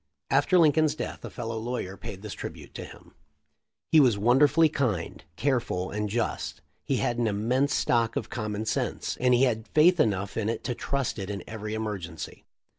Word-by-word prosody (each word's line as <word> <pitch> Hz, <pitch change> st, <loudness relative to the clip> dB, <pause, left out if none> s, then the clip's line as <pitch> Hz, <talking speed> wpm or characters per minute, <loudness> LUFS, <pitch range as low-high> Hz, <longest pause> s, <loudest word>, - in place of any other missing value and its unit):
After 185 Hz, -, +4 dB
Lincoln's 155 Hz, -2 st, +4 dB
death -, -, -5 dB
a -, -, -5 dB
fellow 115 Hz, 0 st, -4 dB
lawyer 115 Hz, -5 st, -4 dB
paid 100 Hz, 0 st, -8 dB
this 105 Hz, -, -5 dB
tribute -, -, -8 dB
to -, -, -6 dB
him -, -, -14 dB, 0.4 s
:* -, -, -53 dB
"He 160 Hz, -, +7 dB
was 125 Hz, -7 st, +5 dB
wonderfully 140 Hz, +9 st, +5 dB
kind, 120 Hz, -, -2 dB
careful, 120 Hz, -9 st, -1 dB
and 105 Hz, 0 st, -2 dB
just. 115 Hz, +2 st, -2 dB, 0.2 s
He -, -, 0 dB
had 120 Hz, 0 st, 0 dB
an 120 Hz, -, +2 dB
immense 120 Hz, +7 st, +1 dB
stock 115 Hz, -1 st, +1 dB
of -, -, -2 dB
common 105 Hz, -2 st, -3 dB
sense, -, -, -2 dB
and 125 Hz, 0 st, +4 dB
he 125 Hz, -, +4 dB
had 110 Hz, -3 st, +1 dB
faith 175 Hz, +3 st, +6 dB
enough 100 Hz, -7 st, +1 dB
in 110 Hz, -1 st, 0 dB
it 115 Hz, -, -3 dB
to 125 Hz, -, -1 dB
trust 135 Hz, -2 st, -2 dB
it 95 Hz, 0 st, -5 dB
in 100 Hz, -3 st, -4 dB
every 110 Hz, -1 st, -5 dB
emergency. 105 Hz, -5 st, -5 dB
Mr. -, -, -65 dB
115 Hz, 190 wpm, -27 LUFS, 105-135 Hz, 0.4 s, He